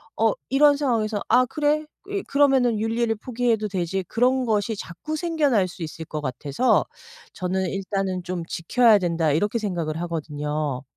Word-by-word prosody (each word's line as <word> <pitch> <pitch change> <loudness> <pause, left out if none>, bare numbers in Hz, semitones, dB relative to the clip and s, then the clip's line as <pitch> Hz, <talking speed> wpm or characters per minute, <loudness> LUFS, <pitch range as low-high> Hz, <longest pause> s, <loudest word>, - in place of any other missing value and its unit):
어 225 0 +3 0.2
이런 285 +2 +5
상황에서 225 -7 0
'아 255 +1 +5
그래. 300 +3 0 0.2
이 400 -1 -2
그러면은 265 -5 +3
윤리를 225 +1 0
포기해도 230 -1 -1
되지.' 190 -1 -2
그런 255 +4 +2
것이 220 0 0
자꾸 205 - -6
생겨날 295 - +1
수 180 +1 -12
있을 160 0 -6
것 155 0 -5
같아서 145 - +1 0.5
저는 185 0 -1
'일단은 195 -1 -2
좀 175 -1 -4
지켜야 215 +7 +3
된다.' 165 -4 +1
이렇게 205 +10 +1
생각을 170 -7 -3
하거든요. 150 -4 -3
210 Hz, 335 characters per minute, -24 LUFS, 170-250 Hz, 0.5 s, 이런